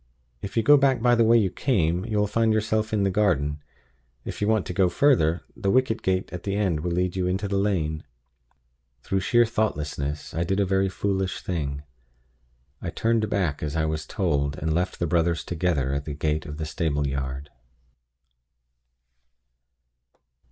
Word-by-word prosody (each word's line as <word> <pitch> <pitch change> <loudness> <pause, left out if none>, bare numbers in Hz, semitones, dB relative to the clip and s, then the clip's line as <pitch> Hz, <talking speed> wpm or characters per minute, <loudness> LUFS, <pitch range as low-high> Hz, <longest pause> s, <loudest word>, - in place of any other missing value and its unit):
If 100 - -6
you 115 - +3
go 145 +5 +7
back 135 -2 +3
by 120 +1 +3
the 115 -1 +4
way 115 +1 +5
you 100 -5 +2
came, 90 - 0
you 110 -2 -2
will 105 - +3
find 115 +2 +1
yourself 110 0 0
in 105 -2 +1
the 95 - +1
garden. 75 -8 +1 0.7
If - - -6
you 105 - +1
want 110 -3 +2
to - - -5
go 95 0 +3
further, 85 - +2
the 100 - -2
wicket 125 0 +2
gate 95 0 -1
at 90 - -5
the 100 +1 -3
end 95 -7 0
will 90 +3 -3
lead 90 +1 -1
you 90 -1 0
into 95 +2 -1
the 100 0 0
lane." 80 -7 -1 1.0
Through 95 - 0
sheer 120 +5 +3
thoughtlessness, 75 -10 -2
I 85 - 0
did 95 +3 -1
a 100 - +3
very 95 0 +1
foolish 95 0 -2
thing. 70 -5 -3 1.0
I - - -4
turned 115 -1 0
back 85 -8 -1
as 75 0 -3
I 80 -1 +1
was 80 0 -3
told, 75 -6 -1
and 80 +1 -1
left 90 +3 -1
the 85 - -1
brothers 85 0 +1
together 80 -6 -1
at 70 +1 -3
the 75 - -5
gate 75 +1 -1
of 75 0 -7
the 80 - -3
stable 75 -2 -1
yard. 70 +1 -4
90 Hz, 180 wpm, -25 LUFS, 80-105 Hz, 1.0 s, go